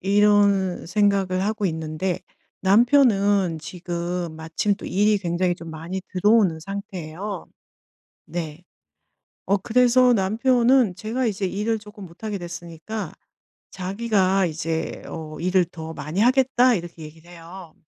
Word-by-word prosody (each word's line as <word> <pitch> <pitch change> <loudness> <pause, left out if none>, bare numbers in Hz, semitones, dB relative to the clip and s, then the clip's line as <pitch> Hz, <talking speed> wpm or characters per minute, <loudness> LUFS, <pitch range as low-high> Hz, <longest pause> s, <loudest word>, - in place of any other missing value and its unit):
이런 200 -2 +3
생각을 195 -1 +1
하고 215 -1 -1
있는데 160 +2 -3 0.4
남편은 200 - +4
지금 175 0 -4
마침 165 +6 -1
또 - - -9
일이 210 +2 +2
굉장히 175 -1 0
좀 165 -1 -10
많이 165 +4 -5
들어오는 190 -3 +3
상태예요. 195 0 -6 0.8
네. 160 -1 -5 0.8
어 200 - +3
그래서 250 +3 +4
남편은 235 +2 +3
제가 230 +5 -2
이제 200 -2 -1
일을 215 +4 -1
쪼끔 210 -1 -12
못 170 +5 -15
하게 210 -2 -2
됐으니까 175 +4 -7 0.6
자기가 195 -1 +1
이제 160 0 -3
어 155 -1 -7
"일을 185 0 +2
더 160 -2 -8
많이 155 +7 -3
하겠다." 255 +1 +4
이렇게 170 -4 -6
얘기를 160 +3 -13
해요. 170 0 -11
190 Hz, 265 characters per minute, -23 LUFS, 170-210 Hz, 0.8 s, 남편은